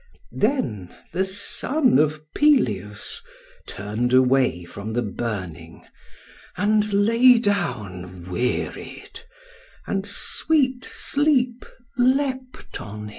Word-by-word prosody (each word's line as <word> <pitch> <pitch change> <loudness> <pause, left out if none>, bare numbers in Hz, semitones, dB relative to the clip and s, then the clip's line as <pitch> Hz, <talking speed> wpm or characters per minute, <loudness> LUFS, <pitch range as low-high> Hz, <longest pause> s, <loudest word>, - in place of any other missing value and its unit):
Then 120 - -1 0.2
the 185 +3 +1
son 215 - +1
of 155 0 +1
Peleus 105 - +1 0.5
turned 110 +5 -2
away 130 -7 +3
from 100 +5 -7
the 120 +1 0
burning 100 -6 -5 0.7
and 210 0 +2
lay 230 +5 +5
down 95 - -3
wearied, 125 - -3 0.7
and 195 -1 -1
sweet 260 +5 0
sleep 260 -4 0 0.3
leapt 260 0 0
on 105 0 -8
him." 105 0 -7
185 Hz, 90 wpm, -23 LUFS, -, 0.7 s, lay